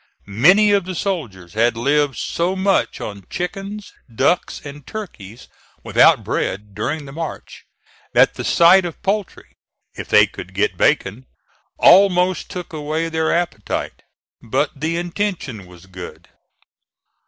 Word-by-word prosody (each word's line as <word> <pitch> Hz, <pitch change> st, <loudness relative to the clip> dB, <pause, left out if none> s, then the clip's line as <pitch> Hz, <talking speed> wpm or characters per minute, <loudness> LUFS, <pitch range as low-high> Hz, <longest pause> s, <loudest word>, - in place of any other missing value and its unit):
Many 180 Hz, -, +4 dB
of 200 Hz, -3 st, +2 dB
the 185 Hz, 0 st, -5 dB
soldiers 120 Hz, -, -4 dB
had 115 Hz, +1 st, +1 dB
lived 140 Hz, +1 st, +1 dB
so 175 Hz, +3 st, -1 dB
much 190 Hz, 0 st, 0 dB
on 100 Hz, -3 st, -8 dB
chickens, 195 Hz, +3 st, -5 dB, 0.2 s
ducks 135 Hz, +10 st, 0 dB
and 145 Hz, -1 st, -10 dB
turkeys 125 Hz, -, -9 dB, 0.4 s
without -, -, +4 dB
bread 105 Hz, +1 st, -3 dB
during 145 Hz, +9 st, -3 dB
the 135 Hz, -, -10 dB
march, 165 Hz, +2 st, -7 dB, 0.5 s
that -, -, +5 dB
the -, -, -6 dB
sight 175 Hz, +3 st, +5 dB
of 175 Hz, -3 st, -6 dB
poultry, 195 Hz, -, -3 dB, 0.4 s
if -, -, -8 dB
they -, -, +6 dB
could 95 Hz, -, -11 dB
get 100 Hz, -1 st, 0 dB
bacon, 105 Hz, +8 st, 0 dB, 0.5 s
almost 180 Hz, -1 st, +4 dB
took 180 Hz, -2 st, -7 dB
away 155 Hz, +2 st, -2 dB
their 160 Hz, -1 st, 0 dB
appetite. 170 Hz, -12 st, -3 dB, 0.4 s
But 130 Hz, +6 st, -1 dB
the 160 Hz, +4 st, -2 dB
intention 175 Hz, -, -4 dB
was 90 Hz, 0 st, -16 dB
good. 90 Hz, -1 st, -10 dB
155 Hz, 130 wpm, -20 LUFS, 110-180 Hz, 0.5 s, they